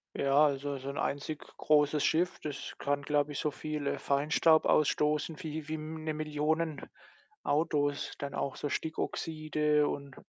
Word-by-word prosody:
Ja, 140 +2 +4
also, 140 0 -1
so 135 +1 -6
'n 140 - -5
einzig 145 +2 -2 0.2
großes 150 -1 +3
Schiff, 175 +3 +1
das 145 -2 -5
kann, 145 0 0
glaube 145 0 +1
ich, 140 - -4
so 150 - +1
viel, 150 0 -4
äh, - - 0
Feinstaub 155 +3 +3
ausstoßen 150 +2 +2
wie 155 -2 -5
wie 155 - -3
M 155 0 -6
'ne 155 - -1
Millionen 155 0 -1 0.6
Autos. 145 -2 +1
Dann 140 0 -4
auch 135 - -2
so 145 - -3
Stickoxide 155 -1 0
und 140 -2 -5
150 Hz, 155 wpm, -31 LUFS, 145-155 Hz, 0.6 s, Ja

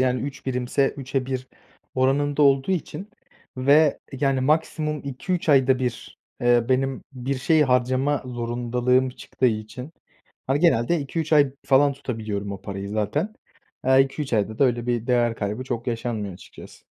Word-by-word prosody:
yani, 125 -1 +1
3 140 0 -7
birimse 130 +1 +1
3'e 135 -1 -3
1 130 -1 -4 0.5
oranında 140 +3 +2
olduğu 135 +2 +4
için 190 +3 -4 0.5
ve, 145 +3 +4
yani, 135 -1 0
maksimum 150 +1 0
2-3 165 +7 -3
ayda 130 -3 +4
1, 125 -3 -4 0.2
eee, 120 -1 +3
benim 135 0 0
bir 130 +1 -3
şey 155 +4 +3
harcama 130 +2 +1
zorundalığım 125 +1 0
çıktığı 130 +1 -2
için, 115 +5 -3 0.5
hani, 135 +2 +1
genelde 165 -1 +3
2-3 155 +3 -3
ay 145 -3 +5
falan 140 +1 +4
tutabiliyorum 110 -7 -4
o 100 - -8
parayı 100 0 -5
zaten. 110 - -2 0.5
Aaa, 130 +1 +4
2-3 135 +1 0
ayda 110 0 0
da - - +5
öyle 120 -2 0
bir 120 -1 -1
değer 120 -2 +2
kaybı 105 +5 -3
çok 120 -2 -4
yaşanmıyor 115 -5 -3
açıkçası. - - -14
130 Hz, 150 wpm, -24 LUFS, 120-140 Hz, 0.5 s, ay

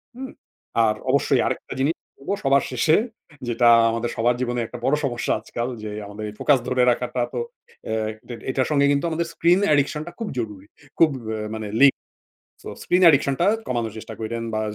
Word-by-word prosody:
হুম। 265 +1 -7 0.5
আর 110 -1 +2
অবশ্যই 135 -1 +3
আরেকটা - - -3
জিনিস 145 +5 +1 0.2
করবো 140 +8 -4
সবার 135 0 +4
শেষে 130 +5 +3 0.5
যেটা 120 0 +2 0.2
আমাদের 115 +1 -2
সবার 120 +2 +2
জীবনেই 120 -1 -1
একটা 120 +2 -9
বড় 140 - +3
সমস্যা 120 -3 -1
আজকাল 120 0 -4 0.2
যে 105 - -5
আমাদের 105 +1 -7
ফোকাস 145 -3 +4
ধরে 125 0 +2
রাখাটাতো 125 0 -2 0.5
অ্যা 110 - -1 0.3
ডে 120 - -6 0.2
এটার 130 0 0
সঙ্গে 140 -1 +3
কিন্তু 140 +3 +1
আমাদের 165 +1 -2
স্ক্রিন 175 +3 +3
অ্যাডিকশন 150 0 +2
টা - - -6
খুব 225 - -3
জরুরি। 105 -4 -6 0.3
খুব 165 - +6 0.2
অ্যা 110 0 -3 0.2
মানে 110 -1 -5
এ - - -3
লিংকড। 140 - +9 0.7
সো - - -9
স্ক্রিন 180 +1 +2
অ্যাডিকশন 145 -4 +5
টা 175 - +3 0.2
কমানোর 115 -3 -2
চেষ্টা 110 0 -8
কইরেন। 115 +1 -4
বা 110 - 0
125 Hz, 185 wpm, -23 LUFS, 115-145 Hz, 0.7 s, লিংকড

